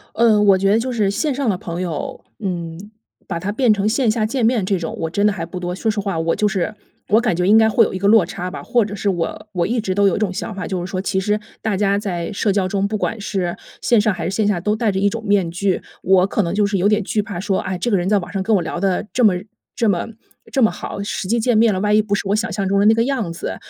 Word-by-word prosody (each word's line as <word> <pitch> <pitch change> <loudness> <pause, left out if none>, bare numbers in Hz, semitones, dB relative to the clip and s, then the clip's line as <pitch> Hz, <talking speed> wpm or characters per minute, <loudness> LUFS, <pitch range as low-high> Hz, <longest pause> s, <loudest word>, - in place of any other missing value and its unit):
嗯， 220 -3 +4
我 195 -2 +6
觉 195 +1 +2
得 215 - +4
就 255 +2 -2
是 215 -4 +1
线 290 +9 0
上 265 -3 -1
的 190 - 0
朋 175 0 -5
友， 165 -5 -4 0.2
嗯， 170 -5 -4 0.5
把 170 -3 -3
他 190 +4 -3
变 230 0 +3
成 205 0 0
线 240 +2 +2
下 220 -1 0
见 235 +2 0
面 225 -4 +2
这 195 0 +1
种， 165 -2 -4
我 165 - -1
真 200 +5 0
的 210 - +4
还 170 -4 -4
不 175 +2 -8
多。 180 0 -3
说 220 +4 -2
实 215 -1 -1
话， 195 -4 -2
我 165 +1 0
就 210 - +1
是 195 +3 -2 0.3
我 220 +3 +4
感 235 -5 +1
觉 180 - 0
应 210 +4 +6
该 220 0 +5
会 225 0 +4
有 - - -4
一 - - -2
个 200 - +1
落 220 -4 +6
差 180 +2 -5
吧， - - -7
或 240 -2 +2
者 205 0 -6
是 200 0 -1
我 175 +3 -3
我 175 -2 0
一 235 +4 0
直 190 -3 -2
都 200 0 +4
有 190 - -1
一 - - -2
种 205 -4 0
想 215 +3 -4
法， 195 - -5
就 180 -3 -3
是 - - -7
说 185 - -2
其 190 0 -1
实 210 +2 0 0.2
大 215 -3 -1
家 200 0 +2
在 180 -5 -3
社 205 +1 +1
交 195 -1 +1
中， 195 +1 0
不 215 0 -2
管 225 - -2
是 185 -4 -2 0.3
线 235 -3 +3
上 210 -1 +1
还 - - -5
是 195 - -3
线 215 - +1
下， 205 -4 +1
都 210 +4 0
戴 220 -2 +1
着 190 - -2
一 200 - +3
种 225 +2 -5
面 200 -5 +2
具。 185 +2 -1 0.2
我 190 0 +4
可 210 - 0
能 170 - -2
就 205 +1 +2
是 200 0 0
有 190 +3 +2
点 210 0 +2
惧 210 +2 0
怕 205 -4 -6
说， 195 0 0
啊， 190 -1 -3
这 180 - -2
个 210 - +2
人 180 +2 -1
在 210 - +4
网 175 - -4
上 195 -1 -1
跟 220 - +1
我 180 - 0
聊 175 - -4
得 195 +1 0
这 250 - +1
么 200 -4 +5 0.4
这 230 - +2
么 175 -4 0 0.4
这 270 - +1
么 220 - +5
好， - - -6
实 195 -1 -4
际 235 - +2
见 230 0 +2
面 225 -2 +4
了， 185 - -1
万 210 +1 +2
一 215 - +5
不 210 -1 -4
是 200 - -3
我 200 - +2
想 225 0 -1
象 195 -1 -2
中 200 +1 +2
的 - - +3
那 220 - +7
个 230 - +2
样 240 -11 -1
子， 165 - -5
200 Hz, 335 characters per minute, -20 LUFS, 185-220 Hz, 0.5 s, 那